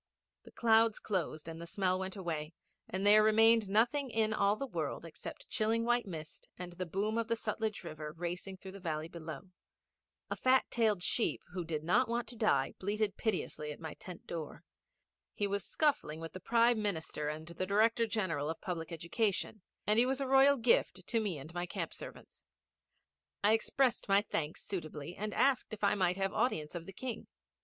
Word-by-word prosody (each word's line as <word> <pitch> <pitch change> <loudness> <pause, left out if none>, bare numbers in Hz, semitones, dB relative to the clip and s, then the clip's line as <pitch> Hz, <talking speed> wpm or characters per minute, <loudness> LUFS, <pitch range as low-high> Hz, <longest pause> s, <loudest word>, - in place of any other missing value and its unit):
The - - -13
clouds 225 -1 +4
closed 170 -6 -2
and 165 0 -7
the 170 - -7
smell 185 0 +1
went 190 +1 -4
away 165 -4 -4 0.3
and 190 +2 -2
there 210 +1 +8
remained 220 0 +5
nothing 240 +7 +2
in 220 -1 +1
all 200 -1 +3
the 275 - -3
world 265 - -3
except - - -9
chilling 225 +1 +1
white 240 -2 +2
mist 160 -4 -8
and 180 -1 -7
the 185 0 -4
boom 210 +6 0
of 230 - -1
the 230 - +1
Sutlej 220 -2 -2
river 155 -2 -6
racing 175 +3 -5
through 190 0 -9
the 200 - -10
valley 160 -3 -3
below. 165 +1 -8 0.8
A - - 0
fat 260 0 +4
tailed 215 -6 +2
sheep, 230 - +1
who 180 -1 -2
did 155 -2 -3
not 230 +9 +3
want 235 +1 -1
to 245 - -8
die, 210 - +2
bleated 205 +1 -1
piteously 180 -8 -2
at 150 - -8
my 160 -2 -6
tent 180 -2 -10
door. 160 -3 -6 0.7
He 205 - 0
was 200 -1 -1
scuffling 275 - 0
with 165 0 -7
the 185 - -6
Prime 230 +3 +3
Minister 160 -6 -2
and 155 +1 -5
the 170 +2 -4
Director 225 +3 +3
General 170 -9 -1
of 160 - -4
Public 170 -2 -4
Education, 195 +5 -1 0.2
and 210 +2 +4
he 245 - +5
was 265 +1 0
a 275 - -1
royal 270 +1 +6
gift 225 -6 +2
to 230 - +1
me 200 -7 -1
and 150 +4 -10
my 175 0 -3
camp - - -4
servants. - - -10 1.0
I 210 +2 +5
expressed 240 +1 +1
my 200 +1 +5
thanks 160 -7 -3
suitably, 165 -4 -5
and 215 +1 -3
asked 265 -3 +2
if 210 - -16
I 200 - +4
might 180 -2 +1
have 195 +1 0
audience 185 -11 0
of 170 -1 -6
the - - -7
King. 240 +2 -5
200 Hz, 195 wpm, -33 LUFS, 170-225 Hz, 1.0 s, there